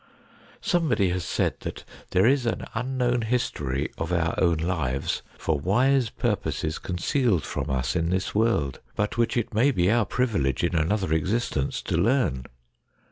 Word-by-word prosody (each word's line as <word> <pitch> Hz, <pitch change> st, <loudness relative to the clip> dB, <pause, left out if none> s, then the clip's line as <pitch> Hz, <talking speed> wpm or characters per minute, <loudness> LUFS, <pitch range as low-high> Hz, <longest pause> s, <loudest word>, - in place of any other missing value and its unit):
Somebody 160 Hz, -, +2 dB
has 90 Hz, 0 st, -2 dB
said -, -, -1 dB
that -, -, -6 dB
' -, -, -22 dB
There 95 Hz, +3 st, +3 dB
is 130 Hz, 0 st, +3 dB
an 115 Hz, -, -2 dB
unknown 125 Hz, 0 st, 0 dB
history 75 Hz, -, -1 dB
of 80 Hz, +1 st, -2 dB
our 85 Hz, -1 st, +1 dB
own 85 Hz, -3 st, +3 dB
lives 80 Hz, -6 st, -1 dB, 0.2 s
for 80 Hz, -3 st, -1 dB
wise 125 Hz, -, +2 dB
purposes 80 Hz, 0 st, -2 dB
concealed 95 Hz, -, 0 dB
from -, -, -4 dB
us 65 Hz, -2 st, -1 dB
in 85 Hz, -1 st, +1 dB
this 95 Hz, +1 st, -1 dB
world, 105 Hz, -, +1 dB, 0.2 s
but 105 Hz, +3 st, -1 dB
which 115 Hz, +1 st, +2 dB
it 115 Hz, -, -1 dB
may 120 Hz, +7 st, +4 dB
be 95 Hz, -7 st, +2 dB
our 115 Hz, -3 st, +2 dB
privilege 100 Hz, -, 0 dB
in 85 Hz, -, +1 dB
another 85 Hz, +2 st, +1 dB
existence 80 Hz, -, -1 dB
to -, -, -1 dB
learn.' 90 Hz, -, +1 dB
95 Hz, 160 wpm, -26 LUFS, 80-120 Hz, 0.2 s, may